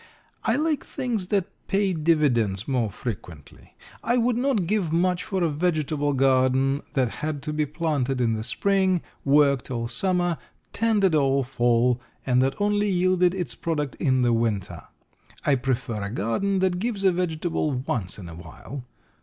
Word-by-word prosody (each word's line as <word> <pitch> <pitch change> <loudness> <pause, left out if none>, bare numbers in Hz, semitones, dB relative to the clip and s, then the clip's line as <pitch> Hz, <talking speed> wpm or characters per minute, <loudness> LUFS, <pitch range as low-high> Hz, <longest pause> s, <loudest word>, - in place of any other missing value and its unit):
I - - +2
like 305 -1 0
things 225 -7 -3
that 195 -2 +1 0.2
pay 195 -1 +1
dividends 135 - +1
more 125 -5 0
frequently. 90 - -8 0.3
I 240 +2 +2
would 240 0 +2
not 245 -6 +1
give 190 -3 0
much 180 +2 +1
for 190 -3 -1
a - - +3
vegetable 155 -2 0
garden 135 +1 +3
that 130 -4 0
had 150 -2 -3
to 150 - -3
be 150 -1 0
planted 145 -4 -1
in 115 -2 +2
the 110 - -2
spring, 190 - +1 0.2
worked 140 -2 +3
all 115 -2 -2
summer, 175 +6 0 0.3
tended 210 -5 +2
all 135 -2 +3
fall, 120 -1 +2 0.2
and 125 -1 +3
that 135 +6 0
only 205 0 +1
yielded 180 -1 +2
its 180 -3 -3
product 150 -5 -2
in 130 -4 +2
the 120 -1 +3
winter. 115 -4 -1 0.6
I 145 - +4
prefer 125 -4 -1
a 100 - -3
garden 120 - 0
that 185 -1 +1
gives 215 -1 -2
a 190 - +5
vegetable 170 -2 -1
once 125 -7 -3
in 95 -4 -9
awhile. 85 - -9
150 Hz, 160 wpm, -25 LUFS, 125-185 Hz, 0.6 s, a